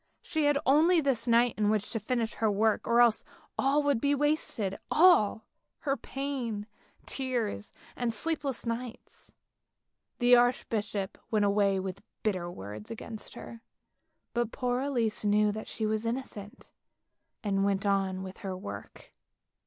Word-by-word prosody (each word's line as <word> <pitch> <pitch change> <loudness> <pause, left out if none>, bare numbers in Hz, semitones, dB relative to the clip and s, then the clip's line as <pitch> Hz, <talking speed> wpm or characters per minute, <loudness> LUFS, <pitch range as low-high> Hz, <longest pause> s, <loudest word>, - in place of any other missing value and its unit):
She 315 -3 0
had 290 -1 +4
only 325 +6 +5
this 265 -6 0
night 235 0 +4
in 210 -1 +3
which 215 -1 0
to 225 - -2
finish 230 +1 -1
her 220 - +1
work, 215 +1 +1
or 235 +1 +5
else 235 -2 +4 0.3
all 285 +2 +2
would 285 -5 +1
be 285 0 +3
wasted, 280 -9 0
all 305 - +5 0.2
— - - -54
her 275 -1 +2
pain, 260 -7 -4 0.4
tears 240 - -3 0.2
and 240 -1 -1
sleepless 280 +1 -2
nights. 230 0 -6 0.9
The 245 0 +6
archbishop 220 -5 0
went 210 -2 +2
away 200 -1 +2
with 190 +1 -5 0.2
bitter 185 -5 -1
words 105 - -8
against 225 -1 -8
her, 230 -1 -9 0.7
but 240 -1 0
poor 250 -2 -1
Elise 240 -7 0
knew 210 0 +3
that 215 +1 -6
she 220 - -3
was 215 0 0
innocent, 230 -4 -6 0.7
and 200 -2 0
she - - +2
went 200 0 0
on 195 -2 +1
with 190 0 -8
her 190 -3 -5
work. 185 - -9
225 Hz, 150 wpm, -30 LUFS, 205-255 Hz, 0.9 s, The